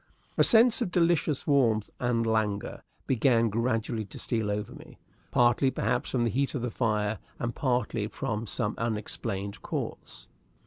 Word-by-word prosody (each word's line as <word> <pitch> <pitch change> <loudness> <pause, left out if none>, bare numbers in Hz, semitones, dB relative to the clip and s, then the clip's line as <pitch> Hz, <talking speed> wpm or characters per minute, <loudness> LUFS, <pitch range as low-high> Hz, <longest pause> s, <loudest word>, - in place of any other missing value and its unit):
A - - +4
sense 235 +1 +6
of 235 - 0
delicious 170 -4 +1
warmth 115 -7 +2
and 120 -2 0
languor 110 -2 -1 0.2
began 115 -2 +3
gradually 115 0 -1
to 100 - -10
steal 110 -3 -1
over 105 0 -3
me, - - -13 0.3
partly, 120 +2 +3
perhaps, 125 -1 -1
from 125 -2 0
the 115 - +1
heat 140 +6 -1
of 125 - -3
the 125 - -2
fire, 110 -3 0 0.2
and 120 0 -3
partly 120 -5 -1
from 110 +1 -4
some 105 0 -2
unexplained 105 -2 -3
cause. - - -6
115 Hz, 150 wpm, -28 LUFS, 110-130 Hz, 0.3 s, sense